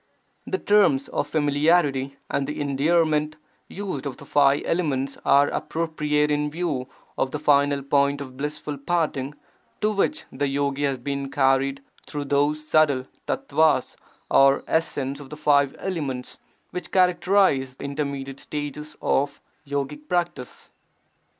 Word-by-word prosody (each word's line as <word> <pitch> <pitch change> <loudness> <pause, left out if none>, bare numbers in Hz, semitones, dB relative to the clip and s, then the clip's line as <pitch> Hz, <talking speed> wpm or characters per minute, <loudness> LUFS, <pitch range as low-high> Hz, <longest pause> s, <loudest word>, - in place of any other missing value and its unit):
[The 385 - -1
terms 200 - +3
of - - -2
familiarity 145 -2 +2
and 140 0 -1
endearment 150 +2 +1 0.3
used 185 -8 -5
of 135 - -6
the - - -12
five 140 -1 +3
elements 140 -6 0
are 140 +1 +5
appropriate 150 -2 -1
in 150 0 +1
view 150 -5 -2 0.3
of 135 - +1
the 150 - -3
final 145 -1 +3
point 140 0 +2
of 130 -2 -8
blissful 150 +1 -4
parting 150 -3 -1 0.4
to 215 0 +1
which 215 +10 0
the 145 - -1
yogi 140 +1 0
has 135 -2 0
been 140 +2 -4
carried 135 0 +1 0.2
through 145 -1 -4
those 145 +2 +1
subtle 145 -5 +3 0.2
tattvas 160 - +1 0.4
or 135 0 +5
essences 145 -4 -1
of 135 - -11
the 150 - -8
five 145 -2 +3
elements 145 -9 -4 0.3
which 180 - -5
characterize 180 -7 +3
intermediate 140 -1 -4
stages 150 +1 -6
of 140 +1 +1 0.3
yogic 145 +1 -4
practice. 175 -8 -3
145 Hz, 130 wpm, -24 LUFS, 140-155 Hz, 0.4 s, are